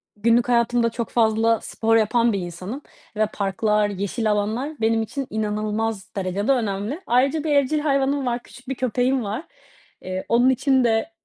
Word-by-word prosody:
günlük 235 +3 +2
hayatımda 235 0 +2
çok 230 0 -4
fazla 225 -1 +2
spor 225 0 0
yapan 230 +1 +2
bir 200 - -1
insanım 185 - -6 0.3
ve 215 - +2
parklar, 210 +1 +1
yeşil 200 +3 -1
alanlar 215 +7 -1
benim 225 0 +2
için 270 +4 -4
inanılmaz 215 -1 -2
derecede 195 +5 -1
önemli. 225 - -1
Ayrıca 275 +5 +2
bir 310 - -1
evcil 285 +2 +2
hayvanım 275 -1 +1
var, 240 -1 -2
küçük 250 +1 -14
bir 270 - -2
köpeğim 255 +1 0
var, 215 +8 -4 0.6
eee, 185 0 -5
onun 245 +3 +4
için 265 0 +2
de 225 +6 +1
230 Hz, 160 wpm, -23 LUFS, 210-255 Hz, 0.6 s, onun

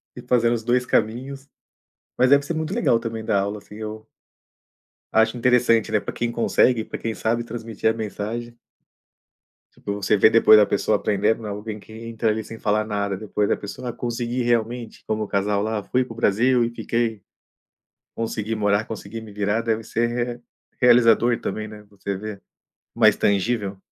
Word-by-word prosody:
ir - - -11
fazer 120 -1 +3
os 115 -2 -1
dois 125 +2 +1
caminhos 130 +5 -1 0.7
Mas 125 - +4
deve 140 0 +6
ser 155 - -3
muito 160 +4 -3
legal 120 - +2
também 115 -1 -5
dar 100 - +2
aula, 100 +2 -3
assim, 105 0 -14
eu 110 0 -7 1.1
acho 110 +2 +3
interessante, 120 -2 +3
né, 110 - +3
pra - - -6
quem 120 0 -2
consegue, 120 0 +2
pra - - -6
quem 115 - -3
sabe 115 +1 -1
transmitir 115 -2 -2
a - - +1
mensagem. 115 +2 -5 1.2
Tipo, 100 - -5
você 100 0 +1
vê 105 +2 +6
depois 110 -1 +7
a 105 - +4
pessoa - - +1
aprendendo, 105 +2 0
alguém 105 +1 -5
que 105 - -17
entra 115 0 -2
ali 110 +1 -1
sem 115 +1 -10
falar 105 +1 +1
nada, 100 -2 -2
depois 105 0 -1
a - - +2
pessoa: 120 +5 -7
"Ah, - - -5
consegui 120 +1 -3
realmente", 120 0 -1
como 110 0 -1
o - - -5
casal 100 0 0
lá: 110 -1 -2
"Fui 125 +5 0
para 115 - -9
o - - -16
Brasil 120 +3 +3
e 115 - 0
fiquei, 115 -3 -2 0.9
consegui 110 -1 -3
morar, 105 0 +1
consegui 110 +1 -7
me 110 -2 -11
virar", 105 +2 0
deve 115 -1 -1
ser 115 +2 0 0.3
re - - -30 0.4
realizador 120 -1 +5
também, 110 0 -4
né, 105 -1 -11
você 100 0 -5
ver 100 -1 -7 0.5
mais 110 -3 +5
tangível. 100 0 0
110 Hz, 180 wpm, -23 LUFS, 105-120 Hz, 1.2 s, depois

